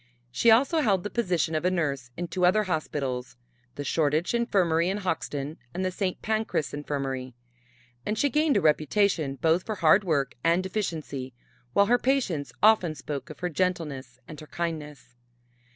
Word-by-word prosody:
She 230 - +3
also 265 +8 +5
held 195 -8 +2
the 205 - -5
position 180 -8 0
of 155 - -1
a 180 - +3
nurse 140 -8 -2
in 175 +1 -3
two 180 +2 -3
other 185 +4 +4
hospitals 140 -9 -3 0.4
the 145 - -4
Shoreditch 155 +4 +1
Infirmary 180 -8 +2
in 195 - -1
Hoxton, 160 -6 -3 0.2
and 185 +1 -1
the 185 - 0
St. 185 0 -2
Pancras 220 -7 -1
Infirmary; 135 -3 -4 0.7
and 210 - -2
she 285 +4 +2
gained 300 -2 +3
a - - +2
reputation 155 -1 +2
both 160 +6 +2
for 215 - -4
hard 185 +2 +4
work 145 -7 0
and 170 +3 +2
efficiency, 160 - -4 0.4
while 200 - +5
her 245 +4 +3
patients 235 - 0
often 210 -7 +5
spoke 145 0 -6
of 155 - -11
her 180 - -1
gentleness 150 -7 -2
and 155 - -9
her 155 - -11
kindness. 150 -7 -5
170 Hz, 170 wpm, -27 LUFS, 145-200 Hz, 0.7 s, also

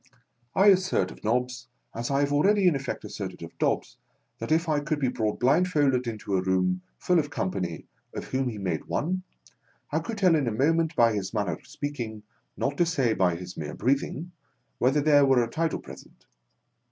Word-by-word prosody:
I 200 +2 +6
assert 185 - +2
of - - -14
Nobbs, 125 +2 -1 0.3
as 115 +1 -4
I 140 0 +2
have 145 0 +1
already 195 +7 +3
in 170 - +4
effect 135 -1 -4
asserted 95 -4 -6
of 85 - -10
Dobbs, - - 0 0.4
that - - -5
if 165 +2 +2
I 150 -2 +2
could 150 +1 -2
be 130 -3 +1
brought 110 -4 -2
blindfold 135 -3 +2
into 105 -3 -3
a - - +1
room 90 -1 +1 0.2
full 180 -1 +2
of 145 -2 -1
company, 90 - -3 0.3
of - - -4
whom 130 -1 -1
he 110 - -6
made 90 -6 -2
one, 185 +4 -1 0.7
I - - +1
could 230 -2 -5
tell 185 -4 +4
in 145 -5 +1
a - - +1
mo 135 +9 +2
ment, 165 -1 0
by 115 -1 +4
his 100 +1 -3
manner 105 -1 0
of - - -11
speaking, 120 -7 -5 0.3
not 140 +1 -1
to 175 - +4
say 135 -9 +1
by 90 -4 +2
his 90 +1 -8
mere 75 -2 -5
breathing, 140 +6 -1 0.5
whether 135 +4 +3
there 145 -1 +5
were 135 -3 +4
a - - -2
title 160 +7 -1
present. - - -13
130 Hz, 200 wpm, -27 LUFS, 105-155 Hz, 0.7 s, I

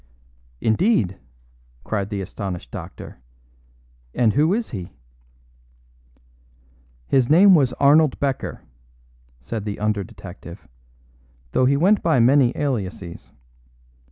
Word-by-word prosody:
"Indeed!" 110 - +1 0.6
cried 100 -2 -3
the 100 -2 -3
astonished 90 - -6
doctor, - - -9 1.0
"and 115 -4 +2
who 155 +4 +2
is 225 +3 -2
he?" 90 - -7 2.1
"His 130 - +1
name 190 +6 +7
was 140 -7 +3
Arnold 145 +1 +3
Becker," 135 -2 -3 0.8
said 110 - -5
the 105 -1 -5
under 105 -1 -1
detective, 90 0 -12 0.8
"though 130 - +2
he 140 +2 +3
went 195 +7 +3
by 160 -6 +2
many 125 +1 +4
aliases. 100 -10 -4
120 Hz, 100 wpm, -22 LUFS, 100-145 Hz, 2.1 s, name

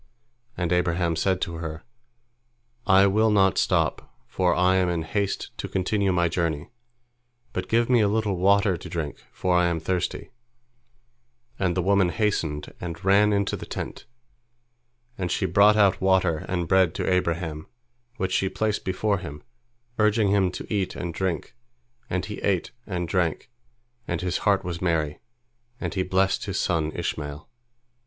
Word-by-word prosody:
And 90 0 0
Abraham 85 -1 +1
said 95 +3 +1
to 85 -1 -3
her, 80 -1 -6 1.0
"I 95 +1 +6
will 110 +3 +3
not 95 -3 +3
stop, - - 0
for 90 +8 +1
I 90 +1 +3
am 90 -1 +2
in 85 -2 -1
haste 100 +3 -2
to - - -3
continue 100 +1 0
my 85 -1 +2
journey, 80 -1 -2 0.8
but - - -4
give 115 +1 +3
me 125 -3 +4
a 105 - +3
little 105 -1 0
water 100 0 +3
to - - -10
drink, 80 -4 -4
for 90 -1 0
I 90 0 +4
am 85 -1 -1
thirsty," 90 +1 -2 1.3
and 90 -1 0
the 90 - +1
woman 100 -1 +3
hastened 85 -8 -1
and 85 0 -6
ran 100 +2 +5
into 100 -1 +1
the - - -8
tent, - - -6 1.1
and 90 -2 -1
she 95 - 0
brought 100 +4 +5
out 100 -2 +4
water 95 -4 +2
and 90 -2 -1
bread 95 -3 +3
to - - -2
Abraham, 85 -4 -1 0.5
which 95 -3 -2
she 95 +1 +1
placed 105 +3 -1
before 100 +1 0
him, 75 -5 -8 0.6
urging 105 -1 +3
him 100 -2 +3
to - - -6
eat 100 -3 -1
and 85 -1 -4
drink, 90 -2 -2 0.6
and 90 0 -1
he 105 0 -6
ate 95 -4 0 0.2
and 90 -3 -3
drank, 90 +2 -1 0.6
and 85 - -2
his 90 -1 -1
heart 100 -1 +3
was 85 -1 -5
merry, 80 -4 0 0.6
and - - -3
he 95 - 0
blessed 95 +1 +1
his 95 -1 -2
son 80 -3 0
Ishmael. 75 0 -4
95 Hz, 160 wpm, -25 LUFS, 85-100 Hz, 1.3 s, I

